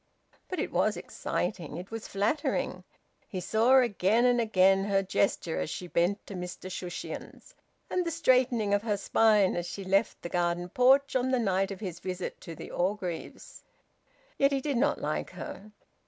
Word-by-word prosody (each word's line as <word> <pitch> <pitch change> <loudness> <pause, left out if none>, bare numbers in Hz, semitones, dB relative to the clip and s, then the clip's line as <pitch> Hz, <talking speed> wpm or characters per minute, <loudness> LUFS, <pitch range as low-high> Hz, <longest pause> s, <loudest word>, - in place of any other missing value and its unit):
But 370 - -3
it - - -2
was - - +1
exciting. 165 -6 -3
It 180 +4 -8
was 225 -1 -6
flattering. 210 +10 -1 0.4
He 185 - -4
saw 225 +8 +4
again 230 -1 +3
and 245 -1 +4
again 195 -3 +4
her 195 -1 +2
gesture 185 -3 0
as - - -2
she 180 - -5
bent 175 +3 0
to - - -9
Mr 180 0 -6
Shushions; 180 -1 -7 0.3
and 365 - 0
the 340 - -2
straightening 255 -9 +2
of 205 - +3
her 210 -2 -1
spine 210 -1 +3
as 175 0 -2
she 195 +3 -6
left 195 +3 +1
the - - -3
garden 175 0 -1
porch 265 +6 +4
on 255 0 +2
the 260 - +2
night 195 -4 +1
of 195 -1 -7
his 180 -5 -5
visit 185 -1 -5
to 165 - -8
the - - -9
Orgreaves... 180 -2 -4 0.8
Yet 275 +1 +4
he 275 - +1
did 275 -1 -1
not 285 +5 +2
like - - -2
her. 210 +2 -8
200 Hz, 175 wpm, -29 LUFS, 185-245 Hz, 0.8 s, saw